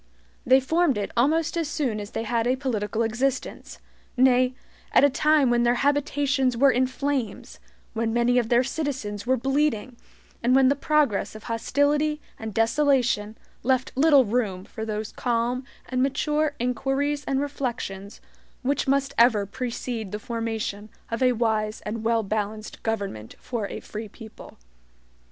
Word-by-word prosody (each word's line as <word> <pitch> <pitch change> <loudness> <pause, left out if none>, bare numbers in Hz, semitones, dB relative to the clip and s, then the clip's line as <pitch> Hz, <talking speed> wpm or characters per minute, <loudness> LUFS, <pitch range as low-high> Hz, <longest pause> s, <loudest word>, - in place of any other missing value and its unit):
They 260 +2 +7
formed 305 0 +1
it 205 - -3
almost 310 +8 +2
as 335 -2 -1
soon 275 -9 -1
as 205 0 -6
they 225 - -4
had 230 +1 0
a 255 - +2
political 230 -4 -2
existence; 250 +4 -2 0.4
nay, 255 0 +4 0.4
at - - +6
a 285 - +5
time 300 -2 +3
when 240 0 +3
their 240 0 +3
habitations 280 -3 +1
were 275 +2 +5
in 255 +1 +2
flames, 265 -5 -3 0.3
when 225 0 -1
many 240 +1 +3
of 230 -2 -2
their 245 +1 +4
citizens 255 -8 -4
were 260 +1 +3
bleeding, 265 -2 0 0.5
and 245 +2 +3
when 265 -1 +5
the 280 - +3
progress 285 -9 +1
of 215 - -10
hostility 285 +6 +1 0.2
and 220 0 -5
desolation 230 -2 +1 0.2
left 260 +1 +1
little 280 -1 +5
room 205 -5 -1
for 220 - -6
those 215 0 -4
calm 245 +1 -1 0.2
and 255 -1 -1
mature 295 +2 0
inquiries 270 +4 -1
and 270 -1 0
reflections 240 -8 -4 0.4
which 275 +1 0
must 275 0 +1
ever 230 -4 +5
precede 235 -1 -4
the 210 - -3
formation 220 -2 -4 0.2
of 230 - -2
a 255 -1 +4
wise 220 -2 0
and 220 +1 -5
well 225 0 +2
balanced 215 +1 -4
government 200 - -4
for 230 -5 -4
a - - -6
free 215 0 -7
people. 220 +1 -13
245 Hz, 155 wpm, -25 LUFS, 220-275 Hz, 0.5 s, They